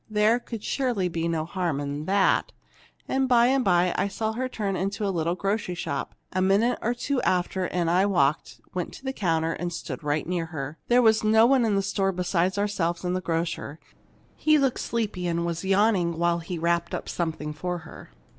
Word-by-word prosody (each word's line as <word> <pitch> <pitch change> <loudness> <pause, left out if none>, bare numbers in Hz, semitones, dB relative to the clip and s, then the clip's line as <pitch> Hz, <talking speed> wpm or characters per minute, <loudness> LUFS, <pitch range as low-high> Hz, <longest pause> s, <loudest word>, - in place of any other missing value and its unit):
There 215 +3 +3
could 230 -3 -7
surely 240 -9 0
be 165 0 -2
no 160 -2 -1
harm 170 -4 -2
in 145 +1 -4
that! 195 +1 +2 0.6
And 265 -1 0
by 240 -1 +6
and 265 0 +2
by 180 -2 +3
I - - +1
saw 220 +2 -2
her 255 +3 -2
turn 205 -5 -2
into 195 +3 -2
a 195 - 0
little 170 0 0
grocery 195 -1 -2
shop; 140 -5 -4 0.2
and 185 - +1
a - - +3
minute 215 +5 +2
or 240 +2 0
two 265 +2 -1
after 180 0 0
in 175 -2 -1
I 180 +4 +3
walked, 155 -5 0
went 180 -2 -3
to - - -13
the 265 0 -3
counter, 165 -6 0
and 175 0 -4
stood 170 - -6
right 145 +1 0
near 175 -1 -2
her. 150 -1 -6
There 245 +1 +4
was 220 -1 +4
no 220 +1 +5
one 255 -1 +4
in 210 -2 +1
the 195 - +1
store 195 -1 0
beside 180 +1 0
ourselves 185 -4 -1
and 180 0 0
the 185 - -1
grocer. 165 -3 -3 0.6
He 310 0 +3
looked 270 -3 +1
sleepy, 210 -6 -2
and 170 0 0
was 170 0 -3
yawning 190 -3 +2
while 170 0 +1
he 170 +1 -5
wrapped 170 +1 0
up - - -6
something 160 -3 -3
for 180 +3 -3
her. - - -12
185 Hz, 210 wpm, -26 LUFS, 170-215 Hz, 0.6 s, by